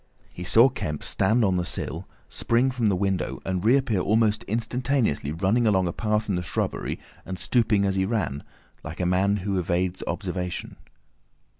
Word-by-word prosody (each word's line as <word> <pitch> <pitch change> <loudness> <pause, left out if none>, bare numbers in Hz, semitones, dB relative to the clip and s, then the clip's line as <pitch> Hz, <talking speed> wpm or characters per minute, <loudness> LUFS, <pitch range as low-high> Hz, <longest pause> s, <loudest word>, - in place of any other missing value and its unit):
He 90 - -7
saw 115 +7 +7
Kemp 75 - -4
stand 110 +4 +3
on 95 -2 +1
the 90 - 0
sill, - - -3 0.2
spring 120 +3 +1
from 120 -4 +1
the 100 - +1
window, 95 0 -1
and 95 -1 -2
reappear 120 -3 +3
almost 110 +2 +2
instantaneously 115 - -1
running 100 +8 +1
along 95 -3 +2
a 85 - -3
path 105 -1 -1
in 100 - 0
the 90 - -1
shrubbery 85 - -3 0.2
and 95 0 -6
stooping 110 -2 +2
as 95 -1 0
he 95 - +2
ran, 100 -10 -2 0.4
like - - -8
a 90 - 0
man 95 +3 +2
who 100 -2 0
evades 90 +1 -1
observation. 90 -1 -4
100 Hz, 170 wpm, -25 LUFS, 90-115 Hz, 0.4 s, saw